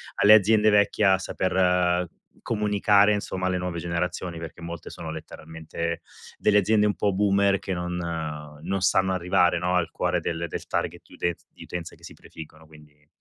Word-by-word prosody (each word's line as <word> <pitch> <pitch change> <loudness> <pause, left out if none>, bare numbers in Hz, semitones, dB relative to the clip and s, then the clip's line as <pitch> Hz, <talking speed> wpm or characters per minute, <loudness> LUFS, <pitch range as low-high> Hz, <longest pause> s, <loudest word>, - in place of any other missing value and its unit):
alle 105 +1 +6
aziende 110 +1 +5
vecchie, 105 0 +3
a 95 -1 +5
saper 90 -2 +1 0.3
comunicare 105 -1 +3
insomma 95 -2 -3
alle 90 0 0
nuove 90 -1 -4
generazioni, 85 0 -3
perché 80 +1 -9
molte 85 -1 -7
sono 80 - -8
letteralmente 80 +1 -6 0.4
delle 105 -1 +3
aziende 105 +1 +3
un 105 - +2
po' 100 -1 0
boomer, 100 0 +2
che 95 - -4
non 90 0 -3 0.7
non 95 +3 -2
sanno 95 +1 +2
arrivare, 90 -1 +2
no, 90 +1 0
al 85 -2 +1
cuore - - -1
del 85 0 -3
del - - -6
target - - -3
di - - -19
utenz 85 -1 -3
di - - -14
utenze 85 -2 -7
che - - -25
si - - -10
prefiggono, 80 0 -13
quindi 75 -1 -19
90 Hz, 175 wpm, -25 LUFS, 85-100 Hz, 0.7 s, alle